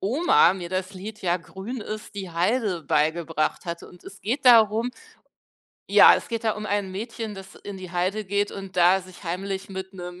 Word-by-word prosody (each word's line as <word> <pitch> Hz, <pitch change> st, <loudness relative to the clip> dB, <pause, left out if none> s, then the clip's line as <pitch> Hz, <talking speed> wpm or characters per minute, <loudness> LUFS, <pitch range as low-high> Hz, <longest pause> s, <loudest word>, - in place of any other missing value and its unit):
Oma 245 Hz, -, +4 dB
mir 180 Hz, -3 st, -6 dB
das 185 Hz, +1 st, -3 dB
Lied 205 Hz, +3 st, -9 dB
„Ja, 175 Hz, -1 st, +2 dB
grün 190 Hz, +8 st, -7 dB
ist 215 Hz, 0 st, -7 dB
die 190 Hz, -3 st, -6 dB
Heide” 185 Hz, 0 st, 0 dB
beigebracht 155 Hz, +3 st, 0 dB
hatte. 170 Hz, -1 st, -6 dB
Und 180 Hz, -, -17 dB
es 195 Hz, -, -12 dB
geht 250 Hz, +8 st, -2 dB
darum 230 Hz, -1 st, +6 dB, 1.0 s
ja, -, -, +9 dB
es -, -, -4 dB
geht 230 Hz, -1 st, -4 dB
da 220 Hz, -, +2 dB
um 210 Hz, 0 st, -6 dB
ein 200 Hz, -2 st, -1 dB
Mädchen, 220 Hz, +1 st, -5 dB
das 195 Hz, 0 st, -11 dB
in 200 Hz, -1 st, -6 dB
die 185 Hz, -2 st, -9 dB
Heide 185 Hz, +4 st, -1 dB
geht 205 Hz, +1 st, -1 dB
und 195 Hz, -1 st, -8 dB
da 180 Hz, +2 st, +5 dB
sich 185 Hz, +1 st, -14 dB
heimlich 190 Hz, +3 st, -4 dB
mit 190 Hz, 0 st, -7 dB
'nem 180 Hz, -1 st, -8 dB
195 Hz, 195 wpm, -25 LUFS, 180-215 Hz, 1.0 s, ja